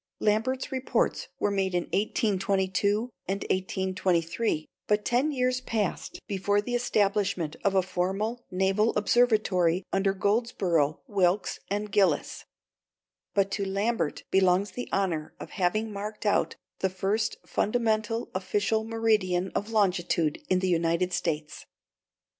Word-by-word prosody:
Lambert's 225 Hz, +5 st, 0 dB
reports 265 Hz, -, 0 dB
were 205 Hz, -, +1 dB
made 190 Hz, -2 st, 0 dB
in 175 Hz, -, +1 dB
1822 200 Hz, +2 st, 0 dB, 0.2 s
and 195 Hz, +2 st, -2 dB
1823, 185 Hz, -1 st, 0 dB, 0.2 s
but 210 Hz, 0 st, +1 dB
ten 255 Hz, +6 st, +2 dB
years 255 Hz, -2 st, 0 dB
passed 220 Hz, -6 st, -2 dB
before 205 Hz, +1 st, +1 dB
the 245 Hz, +4 st, -3 dB
establishment 200 Hz, -8 st, +1 dB
of 195 Hz, -1 st, +2 dB
a 190 Hz, -, +4 dB
formal 195 Hz, +6 st, -2 dB
Naval 195 Hz, +4 st, +1 dB
Observatory 205 Hz, -6 st, +3 dB
under 195 Hz, 0 st, +2 dB
Goldsborough, 190 Hz, -7 st, +1 dB
Wilkes, 195 Hz, -4 st, +1 dB
and 205 Hz, +1 st, -2 dB
Gilliss. 200 Hz, -2 st, +1 dB, 0.9 s
But 195 Hz, -1 st, +2 dB
to 200 Hz, -, -1 dB
Lambert 195 Hz, -2 st, -1 dB
belongs 190 Hz, +1 st, +3 dB
the 245 Hz, -, -6 dB
honor 170 Hz, -6 st, -1 dB
of -, -, -8 dB
having 215 Hz, +3 st, 0 dB
marked 210 Hz, +2 st, -6 dB
out 205 Hz, -, +2 dB, 0.2 s
the 190 Hz, -, +1 dB
first 195 Hz, +4 st, -1 dB
fundamental 225 Hz, 0 st, 0 dB
official 205 Hz, +3 st, 0 dB
meridian 215 Hz, -5 st, +1 dB
of 205 Hz, -, -2 dB
longitude 175 Hz, -7 st, +1 dB
in 185 Hz, -, +3 dB
the 185 Hz, 0 st, 0 dB
United 170 Hz, +1 st, +1 dB
States. 160 Hz, -4 st, -3 dB
200 Hz, 125 wpm, -28 LUFS, 185-220 Hz, 0.9 s, a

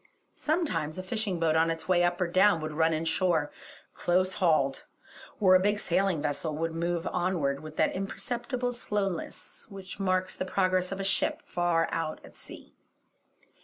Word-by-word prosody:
Sometimes 185 Hz, -, -1 dB
a 185 Hz, -, -4 dB
fishing 200 Hz, -2 st, -2 dB
boat 160 Hz, -1 st, +2 dB
on 160 Hz, +1 st, +3 dB
its 165 Hz, 0 st, -4 dB
way 180 Hz, -1 st, +3 dB
up 175 Hz, 0 st, +1 dB
or 180 Hz, -, +2 dB
down 185 Hz, +1 st, +4 dB
would 155 Hz, 0 st, -4 dB
run 160 Hz, +1 st, +2 dB
in 160 Hz, +1 st, -1 dB
shore, 160 Hz, -2 st, +1 dB, 0.4 s
close 185 Hz, +2 st, +1 dB
hauled; 145 Hz, -6 st, +2 dB, 0.6 s
or 185 Hz, -3 st, +5 dB
a 185 Hz, -, +7 dB
big 205 Hz, +2 st, +1 dB
sailing 185 Hz, -4 st, +1 dB
vessel 150 Hz, +1 st, -2 dB
would 165 Hz, +1 st, -1 dB
move 170 Hz, +1 st, -2 dB
onward 170 Hz, -7 st, 0 dB
with 155 Hz, +1 st, -10 dB
that 155 Hz, -, +2 dB
imperceptible 245 Hz, +6 st, -3 dB
slowness 205 Hz, -7 st, -4 dB
which 195 Hz, -1 st, -9 dB
marks 185 Hz, -1 st, 0 dB
the -, -, -3 dB
progress 185 Hz, -1 st, +1 dB
of 195 Hz, -, -4 dB
a -, -, -2 dB
ship 195 Hz, -, 0 dB
far 175 Hz, -2 st, +1 dB
out 160 Hz, -1 st, -2 dB
at -, -, -16 dB
sea. -, -, -12 dB
175 Hz, 170 wpm, -29 LUFS, 165-195 Hz, 0.6 s, a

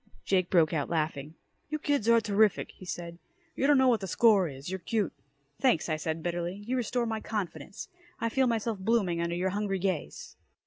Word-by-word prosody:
Jake 185 Hz, -2 st, +2 dB
broke 170 Hz, -3 st, +4 dB
out 145 Hz, -3 st, -1 dB
laughing. 155 Hz, -2 st, -2 dB, 0.3 s
"You 305 Hz, -, -1 dB
kids 285 Hz, -7 st, 0 dB
are 230 Hz, 0 st, +7 dB
terrific," 215 Hz, -2 st, +2 dB
he 185 Hz, -, -13 dB
said. 170 Hz, -1 st, -6 dB, 0.4 s
"You 275 Hz, -, +1 dB
don't 290 Hz, -1 st, +6 dB
know 260 Hz, 0 st, +5 dB
what 235 Hz, -3 st, +4 dB
the 195 Hz, -, -5 dB
score 200 Hz, -1 st, +4 dB
is. 135 Hz, -2 st, -9 dB
You're 190 Hz, +1 st, -3 dB
cute!" 205 Hz, +1 st, -1 dB, 0.5 s
"Thanks," 245 Hz, -11 st, +2 dB
I 155 Hz, -, +1 dB
said 160 Hz, +1 st, -3 dB
bitterly. 175 Hz, +3 st, -3 dB
"You 250 Hz, +3 st, -1 dB
restore 245 Hz, 0 st, 0 dB
my 220 Hz, -1 st, -2 dB
confidence. 195 Hz, -6 st, -5 dB, 0.3 s
I 230 Hz, -, 0 dB
feel 265 Hz, +2 st, +2 dB
myself 225 Hz, -2 st, -1 dB
blooming 190 Hz, -5 st, +1 dB
under 170 Hz, 0 st, -1 dB
your 185 Hz, +2 st, 0 dB
hungry 200 Hz, -1 st, -1 dB
gaze." 185 Hz, -4 st, -3 dB
195 Hz, 195 wpm, -29 LUFS, 170-230 Hz, 0.5 s, are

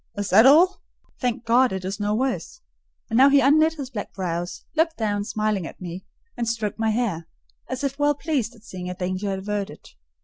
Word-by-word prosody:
"Is 205 Hz, -1 st, -3 dB
that 220 Hz, +7 st, +7 dB
all? 345 Hz, +7 st, +5 dB, 0.4 s
Thank 245 Hz, -2 st, -2 dB
God 245 Hz, +3 st, +4 dB
it 190 Hz, -1 st, -4 dB
is 195 Hz, +2 st, -4 dB
no 205 Hz, 0 st, 0 dB
worse!" 265 Hz, -, -2 dB, 0.5 s
And 225 Hz, -, +2 dB
now 270 Hz, +2 st, +7 dB
he 280 Hz, 0 st, +6 dB
unknit 310 Hz, +4 st, +4 dB
his 275 Hz, -4 st, -7 dB
black 210 Hz, -5 st, -5 dB
brows; 175 Hz, -2 st, -4 dB
looked 320 Hz, +1 st, +1 dB
down, 205 Hz, -2 st, -1 dB
smiling 215 Hz, -5 st, -1 dB
at -, -, -12 dB
me, 180 Hz, +1 st, -7 dB, 0.3 s
and 235 Hz, -1 st, -2 dB
stroked 220 Hz, -2 st, -3 dB
my 225 Hz, 0 st, +1 dB
hair, 215 Hz, -8 st, -1 dB, 0.4 s
as 260 Hz, +2 st, -4 dB
if 275 Hz, 0 st, -2 dB
well 290 Hz, 0 st, +3 dB
pleased 280 Hz, -7 st, -2 dB
at 220 Hz, -, -20 dB
seeing 180 Hz, -4 st, -7 dB
a 180 Hz, -, -5 dB
danger 185 Hz, +2 st, -2 dB
averted. 195 Hz, -4 st, -4 dB
220 Hz, 200 wpm, -24 LUFS, 195-270 Hz, 0.5 s, that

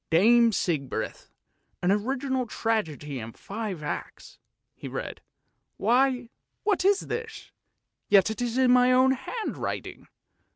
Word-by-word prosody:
" -, -, -56 dB
' -, -, -53 dB
Dame 235 Hz, +5 st, +6 dB
Sigbrith,' 155 Hz, -9 st, -2 dB, 0.5 s
an 180 Hz, -, +3 dB
original 260 Hz, +4 st, -1 dB
tragedy 160 Hz, -, -2 dB
in 110 Hz, 0 st, -7 dB
five 200 Hz, -6 st, -6 dB
acts," 150 Hz, -, -6 dB, 0.3 s
he -, -, -9 dB
read. -, -, -6 dB, 0.3 s
" -, -, -50 dB
Why, 250 Hz, +1 st, +2 dB, 0.3 s
what 410 Hz, -4 st, +1 dB
is 400 Hz, +1 st, +4 dB
this, 460 Hz, -1 st, -6 dB, 0.6 s
yet 200 Hz, +1 st, +5 dB
it 220 Hz, -, -5 dB
is 240 Hz, 0 st, -1 dB
in 260 Hz, -1 st, +4 dB
my 250 Hz, 0 st, +5 dB
own 255 Hz, +1 st, +5 dB
handwriting. 265 Hz, -, -4 dB
235 Hz, 135 wpm, -27 LUFS, 195-260 Hz, 0.6 s, Dame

